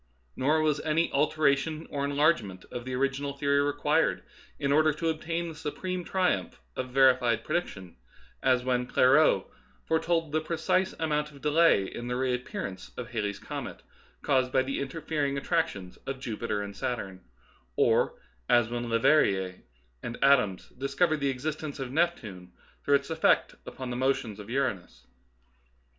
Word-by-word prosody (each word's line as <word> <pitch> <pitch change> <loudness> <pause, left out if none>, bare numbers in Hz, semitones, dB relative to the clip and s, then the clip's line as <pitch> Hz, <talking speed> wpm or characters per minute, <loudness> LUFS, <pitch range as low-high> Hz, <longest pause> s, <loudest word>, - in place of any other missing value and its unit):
Nor 155 +4 +2
was 150 -1 +2
any 160 +2 +1
alteration 150 +1 +1
or 140 -1 -2
enlargement 140 - +1
of 120 0 -6
the 130 0 -3
original 135 +1 -1
theory 140 0 +2
required 145 0 +1 0.3
in 140 - -1
order 155 +2 +4
to 160 +2 -2
obtain 165 +2 -2
the 165 - -6
supreme 180 +4 -4
triumph 185 +1 -1 0.2
of 130 0 -4
verified 125 -3 +4
prediction, 100 - -3 0.5
as 125 -1 +3
when 125 -1 0
Clairaut 130 -5 +4 0.4
foretold 165 -1 0
the 155 +1 +1
precise 170 +4 0
amount 150 -2 -1
of 140 - -14
delay 150 -9 +4
in 120 +5 -7
the 125 - -2
reappearance 125 -7 -3
of 125 -1 -6
Halley's 105 -4 -2
comet, - - -7 0.4
caused 130 -2 +2
by 130 - +3
the 135 +1 -3
interfering 140 0 -2
attrac 165 +4 +1
tions 90 -2 -10
of 135 -1 -4
Jupiter 115 -4 -3
and 100 0 -8
Saturn, 95 -6 -4 0.5
or - - +3 0.3
as 120 -2 +4
when 120 0 -3
Leverrier 100 -7 +2 0.4
and 115 - -5
Adams 125 -9 +3
discovered 140 +5 0
the 140 -1 +1
existence 150 +3 -4
of 135 -3 -5
Neptune 110 - -2 0.3
through 145 - +4
its 140 +3 -1
effects 160 0 +2
upon 130 -1 -6
the - - -3
motions 125 -5 -1
of 105 +1 -9
Uranus. 125 -8 -2
140 Hz, 150 wpm, -28 LUFS, 120-155 Hz, 0.5 s, order